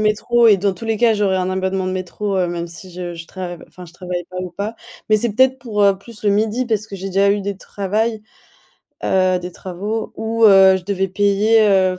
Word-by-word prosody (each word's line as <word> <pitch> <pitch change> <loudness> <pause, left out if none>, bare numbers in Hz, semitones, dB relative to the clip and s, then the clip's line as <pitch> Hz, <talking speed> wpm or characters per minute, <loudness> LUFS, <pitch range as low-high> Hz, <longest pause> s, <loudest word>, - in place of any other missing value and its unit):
métro 220 +3 +2
et 205 -3 +6
dans 195 0 0
tous 205 - -10
les 220 -2 -1
cas, 235 -2 +4
j'aurais 200 -3 +1
un 185 0 -1
abonnement 190 0 -1
de 185 - -2
métro, 190 +2 -3
heu, 180 -1 +1
même 170 0 -4
si 170 +2 -11
je 175 -1 -6
je 165 0 -9
trav 175 -2 -7
enfin, 180 -1 -13
je 170 - -17
travaille 180 -1 -5
pas 185 - -10
ou 180 - -6
pas. 205 +6 -5 0.3
Mais 215 - +5
c'est 215 0 0
peut-être 260 +3 +3
pour, 220 -5 -2
heu, 200 -1 +4
plus 230 +3 -13
le 210 - +1
midi 220 +5 +1
parce 220 -2 -1
que 200 - -8
j'ai 190 +1 -6
déjà 195 +1 +2
eu 205 - -1
des 200 0 -4
travail, 215 +3 -2 0.8
heu, 185 -1 +2
des 180 0 -6
travaux 200 +5 -5
où 225 0 0
heu, 195 -2 +7
je 185 - -8
devais 195 -1 -1
payer, 205 +3 +3
heu, 185 -2 +2
195 Hz, 235 wpm, -19 LUFS, 185-215 Hz, 0.8 s, heu